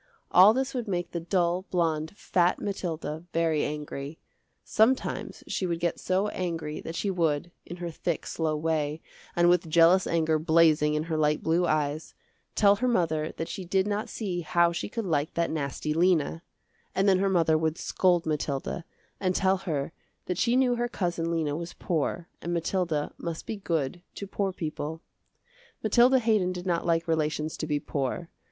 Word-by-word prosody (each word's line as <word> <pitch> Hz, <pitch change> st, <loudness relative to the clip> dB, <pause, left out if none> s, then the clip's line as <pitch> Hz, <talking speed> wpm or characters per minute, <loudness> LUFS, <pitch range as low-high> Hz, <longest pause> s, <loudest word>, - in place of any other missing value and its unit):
All 190 Hz, +4 st, +8 dB
this 265 Hz, +1 st, -1 dB
would 245 Hz, -3 st, -3 dB
make 175 Hz, -3 st, -2 dB
the 170 Hz, -, -2 dB
dull, 175 Hz, +1 st, 0 dB
blonde, 160 Hz, -2 st, 0 dB
fat 175 Hz, -1 st, +2 dB
Mathilda 165 Hz, -5 st, -4 dB
very 165 Hz, -2 st, +2 dB
angry. 150 Hz, 0 st, -5 dB, 0.5 s
Sometimes 235 Hz, +5 st, +1 dB
she 185 Hz, -, -2 dB
would 170 Hz, -1 st, -2 dB
get 170 Hz, 0 st, -1 dB
so 190 Hz, +3 st, +1 dB
angry 165 Hz, -5 st, -4 dB
that 165 Hz, -, -6 dB
she 200 Hz, -, -1 dB
would, 165 Hz, -2 st, 0 dB, 0.2 s
in 175 Hz, -, -7 dB
her 175 Hz, -1 st, -4 dB
thick, 165 Hz, +1 st, -3 dB
slow 155 Hz, -2 st, -1 dB
way, 155 Hz, -1 st, -1 dB, 0.4 s
and 175 Hz, 0 st, +4 dB
with 175 Hz, -1 st, +3 dB
jealous 170 Hz, +3 st, +5 dB
anger 160 Hz, -2 st, +1 dB
blazing 155 Hz, -2 st, +4 dB
in 150 Hz, -, 0 dB
her 160 Hz, -1 st, -2 dB
light 150 Hz, 0 st, +1 dB
blue 170 Hz, +2 st, +2 dB
eyes, 155 Hz, 0 st, -1 dB, 0.4 s
tell 205 Hz, -1 st, +5 dB
her 255 Hz, +4 st, 0 dB
mother 160 Hz, -9 st, +1 dB
that 165 Hz, -, -3 dB
she 190 Hz, -, -5 dB
did 190 Hz, +2 st, +1 dB
not 210 Hz, +1 st, -2 dB
see 185 Hz, -6 st, -3 dB
how 170 Hz, +1 st, +3 dB
she 170 Hz, -, -4 dB
could 230 Hz, 0 st, -4 dB
like 155 Hz, -4 st, -1 dB
that 170 Hz, 0 st, 0 dB
nasty 150 Hz, 0 st, -2 dB
Lena; 165 Hz, -1 st, +2 dB, 0.5 s
and 195 Hz, +1 st, +2 dB
then 190 Hz, -2 st, +5 dB
her 195 Hz, 0 st, +2 dB
mother 165 Hz, -4 st, +3 dB
would 160 Hz, +1 st, 0 dB
scold 180 Hz, -2 st, +1 dB
Mathilda, 150 Hz, +2 st, -2 dB, 0.3 s
and 185 Hz, -2 st, 0 dB
tell 190 Hz, 0 st, +3 dB
her 160 Hz, -7 st, -3 dB, 0.3 s
that 180 Hz, -, -2 dB
she 240 Hz, 0 st, +2 dB
knew 255 Hz, -1 st, +3 dB
her 240 Hz, 0 st, 0 dB
cousin 175 Hz, -6 st, -2 dB
Lena 160 Hz, -3 st, 0 dB
was 170 Hz, +2 st, -5 dB
poor 170 Hz, +1 st, -2 dB
and 175 Hz, -, -4 dB
Mathilda 170 Hz, -3 st, -1 dB
must 165 Hz, -1 st, -5 dB
be 225 Hz, -, -3 dB
good 170 Hz, -5 st, -2 dB
to 200 Hz, -, -5 dB
poor 195 Hz, 0 st, -2 dB
people. 160 Hz, -2 st, -5 dB, 0.8 s
Mathilda 240 Hz, +4 st, +5 dB
Haydon 215 Hz, -7 st, +2 dB
did 180 Hz, 0 st, -7 dB
not 170 Hz, -2 st, 0 dB
like 165 Hz, 0 st, +1 dB
relations 155 Hz, -1 st, 0 dB
to 155 Hz, -, -4 dB
be 150 Hz, -1 st, 0 dB
poor. 145 Hz, +5 st, -3 dB
170 Hz, 180 wpm, -27 LUFS, 155-185 Hz, 0.8 s, All